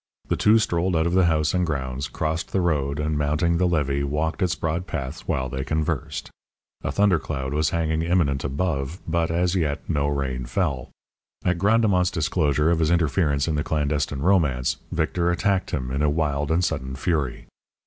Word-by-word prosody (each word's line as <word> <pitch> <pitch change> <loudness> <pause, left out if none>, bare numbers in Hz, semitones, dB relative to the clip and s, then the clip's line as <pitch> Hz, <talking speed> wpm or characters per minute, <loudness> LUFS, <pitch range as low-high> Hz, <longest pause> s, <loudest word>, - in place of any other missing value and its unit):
The - - +2
two 105 +2 +5
strolled 90 -4 +1
out 80 0 +2
of 85 - 0
the 95 -1 +4
house 75 -2 +2
and 90 -1 +2
grounds, 70 -4 -2
crossed 80 +1 -3
the 95 - +1
road, 75 -5 0
and, 75 0 -1
mounting 75 +4 +1
the 90 - +3
levee, 70 -5 0
walked 75 +3 -1
its 90 -1 +1
broad 85 +3 -2
path 70 -1 -4
while 65 - 0
they 65 +1 -4
conversed. 80 -2 -2 0.5
A - - -1
thunder 100 -4 +3
cloud 70 -3 -4
was 75 +1 +2
hanging, 80 -1 0
imminent, 80 -6 +1
above, 70 +1 -2
but, 85 0 0
as 90 +2 +1
yet, 80 -5 -1
no 70 -4 0
rain 65 -3 -2
fell. 65 0 -1 0.6
At 90 -1 +1
Grandemont's 100 -3 +3
disclosure 75 -2 +1
of 85 - +1
his 80 -1 +2
interference 75 -3 +1
in 80 - 0
the 75 -1 0
clandestine 75 -2 -1
romance, 75 -9 +2
Victor 85 -1 0
attacked 90 +2 +1
him, 65 -3 -3
in 70 +2 -1
a 75 - +3
wild 75 -2 0
and 85 +2 +2
sudden 65 +1 -3
fury. 70 -3 -1
80 Hz, 185 wpm, -24 LUFS, 70-85 Hz, 0.6 s, two